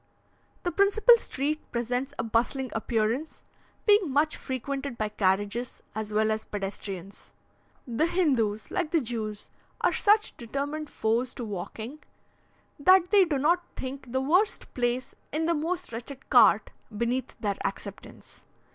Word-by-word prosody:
The 350 - 0
principal 405 +6 +6
street 300 - -1
presents 245 +3 -1
a - - -1
bustling 235 +3 0
appearance, 225 +6 -1 0.4
being 410 -5 +5
much 300 +3 +2
frequented 270 0 -4
by 215 -1 -1
carriages, 205 +4 -1
as 215 0 -4
well 215 +1 +2
as 220 0 -1
pedestrians. 195 -1 -6 0.5
The 245 +6 +1
Hindoos, 255 - +1
like 345 -4 -1
the 330 - +3
Jews, 220 -5 -5 0.3
are - - +3
such 425 0 +3
determined 285 +5 -4
foes 235 +3 0
to 245 - -5
walking, 220 +7 -6 0.8
that 370 +3 +5
they 400 -3 +7
do 310 -5 0
not 340 +6 +2
think 260 -1 -6
the 260 +1 +1
worst 365 +11 +1
place 245 +1 -1 0.2
in 315 +2 0
the 340 - +2
most 325 -3 -3
wretched 250 +4 -8
cart - - +6 0.3
beneath 240 +3 -1
their 200 -2 -1
acceptance. - - -7
260 Hz, 140 wpm, -28 LUFS, 220-310 Hz, 0.8 s, they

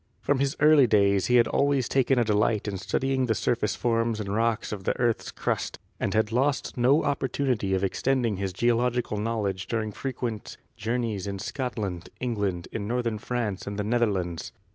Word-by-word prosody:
From 145 -2 +1
his 140 0 0
early 150 -3 +6
days 100 -3 +3
he 125 - +3
had 120 -1 +6
always 140 -3 +1
taken 135 0 +2
a 120 - +4
delight 105 0 +1
in 100 -2 -3
studying 130 +7 0
the 110 - +1
surface 115 -1 0
forms 115 -2 0
and 100 -1 -3
rocks 115 0 0
of 100 -3 -5
the - - 0
earth's 120 -2 +1
crust - - -2 0.2
and 95 - -1
had 110 0 +2
lost 135 +4 0
no 130 +5 +4
opportunity 130 -7 0
of 95 - -1
extending 120 +1 0
his 95 0 -2
geological 120 +2 +1
knowledge 105 -4 -2
during 110 -2 -2
frequent 120 -2 -5 0.2
journeys 110 -3 -2
in 100 -1 -3
Scotland, 100 -7 -4
England, 100 -8 -2
in 100 -2 -4
northern 115 -2 -1
France 110 -4 -3
and 100 0 -4
the 105 - -1
Netherlands. 100 -7 -1
115 Hz, 175 wpm, -27 LUFS, 100-125 Hz, 0.2 s, early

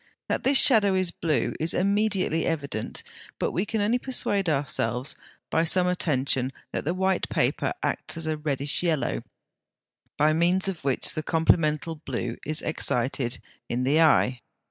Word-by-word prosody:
That - - -1
this 270 +1 +4
shadow 210 -8 +6
is 185 -2 +1
blue 160 -3 -1
is 160 +1 0
immediately 200 -4 +1
evident; 140 -9 -4 0.3
but - - -1
we 190 +4 -2
can 220 0 -1
only 225 +4 +1
persuade 205 -8 0
ourselves 130 -3 0 0.4
by 160 - +2
some 180 +2 +2
attention 135 -7 0 0.2
that - - -4
the 170 +4 -1
white 190 0 0
paper - - 0
acts - - -2
as 165 - -2
a 155 0 -1
reddish 145 -1 -1
yellow, 155 - 0 1.0
by 155 +1 +3
means 175 +4 +1
of 185 -6 -4
which 135 -2 +1
the 155 - -3
complemental 160 -1 +1
blue 120 -5 -4
is 155 +2 -3
excited 125 -4 0 0.3
in 125 +2 -1
the 145 +5 +3
eye. 130 -5 +3
160 Hz, 155 wpm, -25 LUFS, 140-185 Hz, 1.0 s, shadow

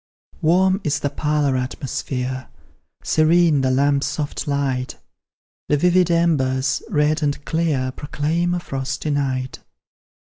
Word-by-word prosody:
Warm 185 +4 +3
is 145 -1 0
the 145 - -1
parlour 150 -2 0
atmosphere, 130 0 -3 0.6
Serene 160 -2 +3
the 130 - +1
lamp's 140 +2 +2
soft 150 +1 -4
light; 135 -3 -1 0.7
The 150 - +3
vivid 180 +2 +3
embers, 140 -6 +1
red 155 -3 +1
and 145 -1 -1
clear, 155 -6 0
Proclaim 160 +6 -1
a - - -1
frosty 135 -1 -4
night. 130 -2 -2
145 Hz, 115 wpm, -21 LUFS, 135-160 Hz, 0.7 s, Warm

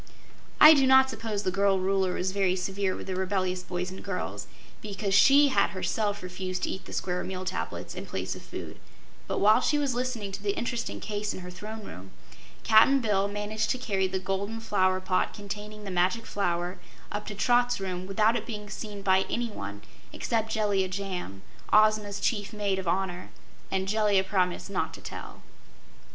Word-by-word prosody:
I 305 +1 +11
do 270 -3 +4
not 265 0 +6
suppose 220 -3 -3
the 185 - 0
girl 195 0 +2
Ruler 190 -1 +1
was 185 +1 -1
very 190 -2 +1
severe 190 +1 -1
with - - -7
the 190 - -3
rebellious 185 -1 -1
boys 180 0 -4
and 190 - -9
girls, 195 -2 -4 0.3
because 200 -1 -3
she 280 +7 +7
had 260 - +3
herself 205 +1 -1
refused 180 0 -4
to - - 0
eat 190 - -6
the - - -10
Square 180 -1 -2
Meal 185 0 -5
Tablets 185 0 -4
in - - -7
place - - -3
of - - -9
food, - - -8 0.5
but - - -2
while 215 +2 +5
she 295 - +2
was 285 -3 0
listening 240 -5 -2
to 195 +1 -6
the 200 -1 -1
interesting 235 -1 -3
case 210 -1 -3
in - - -7
her 180 0 -8
Throne 215 +4 -8
Room, 95 - -10 0.5
Cap'n 225 +5 +6
Bill 205 -5 +1
managed 210 +1 -2
to - - +1
carry 195 -6 0
the 190 0 -2
golden 195 +4 -3
flower 185 -4 +1
pot 185 -1 0
containing 210 +1 -7
the 195 - -5
Magic 185 +6 +1
Flower 180 -1 -2 0.3
up 210 0 -4
to 210 - -5
Trot's 245 +3 +2
room 185 -1 -4
without 215 +4 +3
it - - -3
being 210 -2 -6
seen 205 -2 -6
by 190 0 +3
anyone 100 - -4 0.3
except 225 -1 -1
Jellia 205 -3 +1
Jamb, 185 - -5 0.3
Ozma's 215 -1 +4
chief 205 -2 -1
Maid 200 -2 -1
of 190 - -5
Honor, 180 0 -1 0.4
and 190 0 -1
Jellia 205 -2 +3
promised 185 -2 0
not 200 - -2
to - - -12
tell. - - -9
200 Hz, 185 wpm, -28 LUFS, 185-215 Hz, 0.5 s, I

